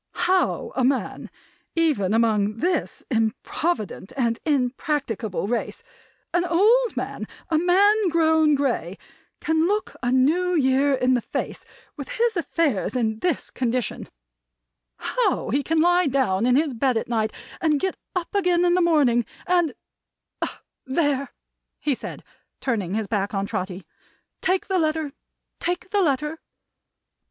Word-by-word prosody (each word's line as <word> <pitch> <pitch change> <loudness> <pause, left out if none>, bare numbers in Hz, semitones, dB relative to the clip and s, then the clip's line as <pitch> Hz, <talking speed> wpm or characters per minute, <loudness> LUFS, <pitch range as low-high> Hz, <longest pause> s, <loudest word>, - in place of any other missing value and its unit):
"How 370 0 +1
a 260 - +1
man, 265 +1 -1 0.5
even 295 - +2
among 215 -2 +2
this 350 +7 -1
improvident 225 - -1
and 235 -3 +1
impracticable 250 - -1
race; 235 +1 -3 0.5
an 350 0 +3
old 430 +8 +3
man; - - -4 0.2
a 315 - +4
man 395 +4 +4
grown 320 -2 +4
grey; 240 - -1 0.4
can 320 +1 +2
look 420 +2 -1
a 245 - 0
New 330 +8 +3
Year 275 -1 +3
in 255 0 +2
the 245 - +2
face - - -5 0.3
with 280 - -7
his 465 -1 +2
affairs 305 - 0
in 220 -3 0
this 355 +5 -1
condition; 250 -1 -2 0.9
how - - 0
he 275 +4 +2
can 320 +3 0
lie 350 0 +4
down 245 -6 +1
on 250 - +4
his 295 -1 +2
bed 250 +1 +1
at - - -2
night, 220 -2 0 0.3
and 305 -3 +2
get 380 +3 -1 0.2
up 355 -2 -3
again 360 -3 +2
in 350 - +4
the 365 - +3
morning, 285 -9 +3 0.2
and 350 -4 +2 1.1
There!" 280 0 0 0.5
he 295 - 0
said, - - -7 0.4
turning 205 -8 -1
his 220 -1 -1
back 205 0 -2
on 195 0 0
Trotty. 185 -1 -4 0.6
"Take 370 0 +1
the 380 -2 0
letter! 310 -2 0 0.5
Take 360 +2 -3
the 410 -1 +3
letter!" 300 0 0
285 Hz, 140 wpm, -24 LUFS, 235-345 Hz, 1.1 s, a